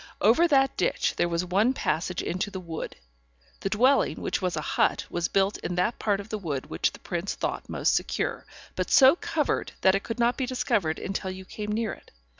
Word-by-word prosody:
Over 245 +12 +5
that 270 -4 +3
ditch - - +1
there 175 - +2
was 170 +1 -1
one 200 +8 +2
passage 175 -3 -1
into 185 +4 -2
the 190 - -6
wood; 165 -3 -6 0.6
the 195 - -2
dwelling, 255 +7 +3
which - - -2
was 180 -2 -1
a - - -1
hut, - - +1
was 170 -1 0
built 195 +1 +1
in 175 - -4
that 185 +6 0
part 205 -2 +1
of 200 +1 -8
the 215 - -3
wood 150 -8 -3
which - - +1
the - - -12
prince 175 +2 -3
thought - - -3
most - - +1
secure, - - -1 0.3
but - - -2
so 265 +2 +7
covered 325 -4 -1
that 190 - +5
it 195 - +1
could 230 +2 -5
not 240 0 +2
be 260 - -1
discovered 195 -10 0
until 195 -1 -3
you 185 0 -7
came 210 +2 -5
near 220 0 -1
it. - - -15
195 Hz, 215 wpm, -27 LUFS, 180-235 Hz, 0.6 s, so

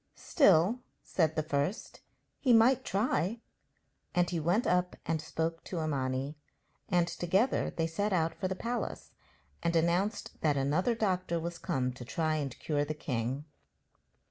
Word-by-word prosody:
'Still,' 200 - +4 0.2
said 160 -3 +1
the 155 - 0
first, 145 +6 -2 0.4
'he 255 -4 +4
might 235 +3 +5
try.' 200 0 0 0.8
And 175 0 +3
he 170 - 0
went 175 +9 +1
up 180 0 +1
and 160 -1 0
spoke 165 +1 -3
to 175 - -4
Imani, 135 0 -2 0.5
and 175 -2 +3
together 190 +10 +1
they 165 - -1
set 200 +6 -1
out 165 -3 +1
for 190 - -3
the 190 - -2
palace 235 +5 -4 0.5
and 170 0 0
announced 175 +6 0
that 150 -3 +2
another 155 - +1
doctor 185 -5 0
was 170 +1 -5
come 130 -7 -1
to 125 - -9
try 155 +5 0
and 140 -4 -4
cure 145 -2 0
the 155 +1 -3
king. 130 0 -3
170 Hz, 150 wpm, -31 LUFS, 150-190 Hz, 0.8 s, might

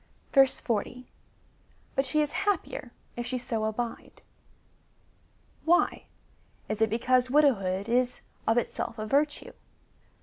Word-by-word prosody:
40. 250 -2 +1 0.8
But 270 0 +1
she 305 +4 +2
is 295 - -3
happier 370 -10 -2 0.2
if 240 0 -4
she 255 0 -2
so 230 -3 -2
abide. 230 +2 -4 1.4
Why? 345 +2 +2 0.6
Is 215 0 -3
it 220 - +4
be 225 - 0
cause 255 +1 +2
widowhood 200 -10 +3
is 250 +1 +1 0.3
of 225 +1 +3
itself 240 0 -2
a 215 - -3
virtue 290 +6 0
245 Hz, 115 wpm, -28 LUFS, 225-275 Hz, 1.4 s, it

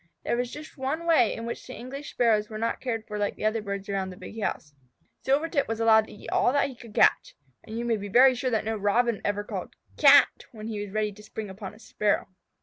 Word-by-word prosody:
There - - 0
was 245 0 -1
just 300 -1 -10
one 290 +6 -2
way 315 -10 +4
in 230 - -5
which 235 - -6
the 255 - -8
English 275 +4 -7
Sparrows 215 -3 +2
were 215 - -6
not 230 +1 -2
cared 225 -4 -3
for 210 -1 -5
like 205 - -2
other 215 +1 0
birds 200 -1 -5
around 195 -2 -2
the 180 - -10
big 220 +3 -8
house. 150 -6 -3 0.5
Silvertip 285 +2 +1
was 225 0 -3
allowed 220 -1 +5
to - - -13
eat 205 - -10
all - - +3
that 285 -1 +2
he 260 - -10
could 230 -3 -14
catch. - - +3 0.3
And 220 +1 -7
you 235 - -2
may 230 -2 +1
be 205 0 -6
very 255 +5 +7
sure 255 +1 -2
that 220 -3 0
no 220 0 -1
Robin 215 +2 +1
ever 205 0 -1
called - - -6 0.2
"Cat!" 285 -2 +6
when 215 -2 -9
he 210 -2 -3
was 205 - -7
ready 215 0 0
to 210 +1 -14
spring 210 -1 -7
upon 195 +1 -8
a - - -18
Sparrow. 210 -3 -1
225 Hz, 245 wpm, -27 LUFS, 210-250 Hz, 0.5 s, very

